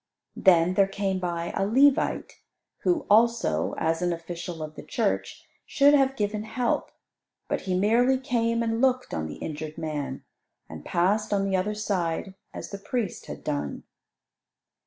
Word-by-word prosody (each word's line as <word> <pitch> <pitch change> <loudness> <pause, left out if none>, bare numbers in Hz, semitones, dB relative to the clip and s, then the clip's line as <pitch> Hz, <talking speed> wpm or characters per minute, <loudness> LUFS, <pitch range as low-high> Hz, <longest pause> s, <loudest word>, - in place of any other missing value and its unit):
Then 180 -2 +4
there 195 +1 +4
came 195 -1 -2
by 170 -2 -3
a 195 - +1
Levite, 265 +7 +3 0.5
who 345 -5 0
also, 230 +2 +3
as 165 +1 0
an 175 0 +1
official 170 -1 -5
of 155 0 -7
the - - -9
church, - - -2 0.2
should 285 0 +4
have 270 -2 +3
given 210 -2 -1
help. 225 +3 -1 0.6
But - - -1
he 180 - +2
merely 235 +7 +3
came 235 -3 0
and 225 0 -1
looked 255 -1 +1
on 80 -1 -2
the 75 - -7
injured 155 0 -6
man, 150 -3 -4 0.4
and - - -9
passed 200 +5 +1
on 200 -1 +1
the 195 - 0
other 200 +3 0
side 190 -3 -2 0.2
as - - -8
the 200 - -6
priest 210 -1 -3
had - - -8
done. 145 -2 -3
200 Hz, 155 wpm, -26 LUFS, 170-230 Hz, 0.6 s, Then